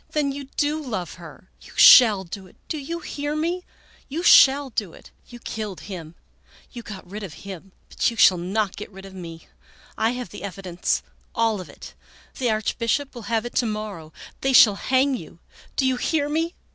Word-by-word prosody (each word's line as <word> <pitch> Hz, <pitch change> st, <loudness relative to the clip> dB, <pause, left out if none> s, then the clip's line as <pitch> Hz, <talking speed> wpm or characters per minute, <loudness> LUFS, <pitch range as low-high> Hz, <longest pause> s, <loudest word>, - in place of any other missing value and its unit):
" -, -, -39 dB
Then 295 Hz, -2 st, +1 dB
you 280 Hz, 0 st, -6 dB
do 300 Hz, +1 st, 0 dB
love 215 Hz, -, -4 dB
her! 170 Hz, +2 st, -13 dB
You -, -, -15 dB
shall 215 Hz, -6 st, +8 dB
do 190 Hz, +2 st, -9 dB
it! -, -, -21 dB
Do 310 Hz, -, -3 dB
you 335 Hz, +5 st, -5 dB
hear 290 Hz, -1 st, -4 dB
me? 340 Hz, +4 st, -2 dB, 0.5 s
You 320 Hz, +5 st, -3 dB
shall 275 Hz, -4 st, +6 dB
do 205 Hz, -7 st, -3 dB
it! -, -, -16 dB, 0.2 s
You 240 Hz, -, -11 dB
killed 215 Hz, -5 st, -6 dB
him! 170 Hz, -5 st, -8 dB, 0.6 s
You 240 Hz, -, -8 dB
got 200 Hz, -5 st, -10 dB
rid 205 Hz, +4 st, -7 dB
of 190 Hz, -7 st, -7 dB
him! 195 Hz, -1 st, -9 dB, 0.2 s
but -, -, 0 dB
you 230 Hz, -, -8 dB
shall 185 Hz, -4 st, +6 dB
not 195 Hz, +3 st, -1 dB
get 210 Hz, -, -8 dB
rid 195 Hz, 0 st, -12 dB
of 195 Hz, -, -11 dB
me. 165 Hz, -3 st, -9 dB, 0.5 s
I 225 Hz, +2 st, +2 dB
have 250 Hz, -5 st, -6 dB
the -, -, -10 dB
evidence, 185 Hz, -2 st, -2 dB, 0.3 s
all 225 Hz, -4 st, +1 dB
of 180 Hz, -, -11 dB
it. -, -, -12 dB, 0.5 s
The 250 Hz, -2 st, +1 dB
Archbishop 230 Hz, +5 st, -1 dB
will 235 Hz, -5 st, -9 dB
have 230 Hz, 0 st, 0 dB
it 240 Hz, -, -6 dB
to 240 Hz, -, +2 dB
morrow. 210 Hz, -7 st, -5 dB, 0.3 s
They 270 Hz, 0 st, +1 dB
shall 220 Hz, -4 st, +8 dB
hang 260 Hz, +6 st, +1 dB
you! -, -, -10 dB, 0.4 s
Do 270 Hz, -, +1 dB
you 260 Hz, -1 st, +1 dB
hear 290 Hz, +3 st, 0 dB
me 325 Hz, +3 st, -1 dB
220 Hz, 200 wpm, -23 LUFS, 190-270 Hz, 0.6 s, shall